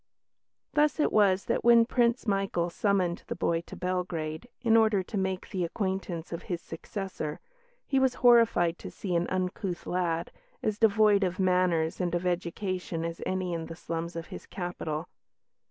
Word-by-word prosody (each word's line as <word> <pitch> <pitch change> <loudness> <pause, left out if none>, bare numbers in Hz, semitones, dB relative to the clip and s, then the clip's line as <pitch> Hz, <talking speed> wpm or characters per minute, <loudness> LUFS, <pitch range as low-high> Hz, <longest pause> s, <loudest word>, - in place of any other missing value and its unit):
Thus 300 +1 +3
it - - +3
was 200 -2 +3
that, - - 0
when 235 -1 +7
Prince 235 0 +1
Michael 195 -4 0
summoned 185 -2 +1
the - - -3
boy 165 0 0
to - - -8
Belgrade, 180 0 -3
in 230 -2 +3
order 220 -4 +4
to 210 - -8
make 190 -1 -2
the 185 -3 -1
acquaintance 185 -2 -3
of 170 - -4
his 175 -2 -1
successor, 165 -2 -5 0.5
he 270 - +2
was 265 -1 +2
horrified 230 -8 +5
to - - -7
see 185 -4 -4
an 170 +1 +1
uncouth 185 0 -2
lad, 170 -2 -1 0.3
as 215 0 -1
devoid 210 -2 +5
of 180 -1 -1
manners 180 -3 +2
and 175 -1 0
of 175 +1 -2
education 180 -1 -2
as 170 0 -5
any 185 -1 -1
in 165 -1 -3
the 165 - -7
slums 165 0 -4
of 165 -1 -4
his - - -9
capital. 175 -3 -4
185 Hz, 170 wpm, -29 LUFS, 170-205 Hz, 0.5 s, when